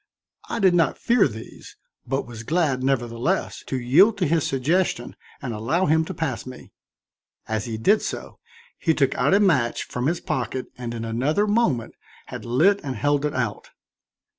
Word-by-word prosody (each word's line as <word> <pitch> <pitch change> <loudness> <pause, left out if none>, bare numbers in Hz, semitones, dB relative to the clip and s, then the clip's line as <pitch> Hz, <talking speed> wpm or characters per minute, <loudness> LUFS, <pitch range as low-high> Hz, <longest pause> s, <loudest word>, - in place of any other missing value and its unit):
I - - -2
did 190 -5 +4
not 170 -2 +2
fear 240 +1 +3
these, 110 +1 -11 0.3
but 135 +2 -1
was 120 -3 -9
glad, 150 -1 0
nevertheless, 130 +5 -1
to 130 - -2
yield 175 - +5
to - - +1
his 160 0 +1
suggestion 135 0 0 0.3
and 125 -4 -3
allow 135 +13 0
him 160 +1 +3
to - - -5
pass 155 -7 -2
me. 130 -1 -11 0.8
As 110 -1 -2
he 115 -2 -4
did 200 - +3
so, - - -6 0.4
he 160 -2 +2
took 135 -2 +2
out - - +2
a - - +5
match 145 - +2
from 125 +2 -3
his 170 +2 0
pocket 130 0 -3
and 120 -1 -5
in 115 0 -4
another 135 - +1
moment 205 - +1 0.4
had - - -7
lit 165 +13 +3
and 135 -3 -4
held 145 +5 +1
it 150 +1 -2
out. - - -3
135 Hz, 175 wpm, -24 LUFS, 120-170 Hz, 0.8 s, yield